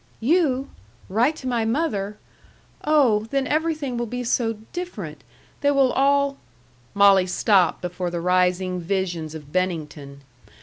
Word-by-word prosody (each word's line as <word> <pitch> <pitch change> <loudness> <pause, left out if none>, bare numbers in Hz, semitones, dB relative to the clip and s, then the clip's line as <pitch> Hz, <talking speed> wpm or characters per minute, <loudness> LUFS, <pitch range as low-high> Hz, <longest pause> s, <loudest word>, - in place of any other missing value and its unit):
"You! 275 0 +1 0.4
Write 235 +10 +2
to 265 - -7
my 240 -3 0
mother! 220 -5 -1 0.7
Oh, 260 -9 +3
then 275 +1 0
everything 305 -4 -1
will 240 0 -2
be 250 +2 -4
so 230 -1 0 0.2
different! 205 - -6 0.4
They 285 - +2
will 275 -3 +3
all 280 0 +2 0.3
" 120 0 -33
Molly 200 -2 +5
stopped 185 -2 +2
before 180 0 -3
the 170 0 -3
rising 180 +1 +1
visions 175 -3 -3
of 150 -2 -10
Bennington. 155 -6 -3
210 Hz, 135 wpm, -23 LUFS, 180-275 Hz, 0.7 s, Molly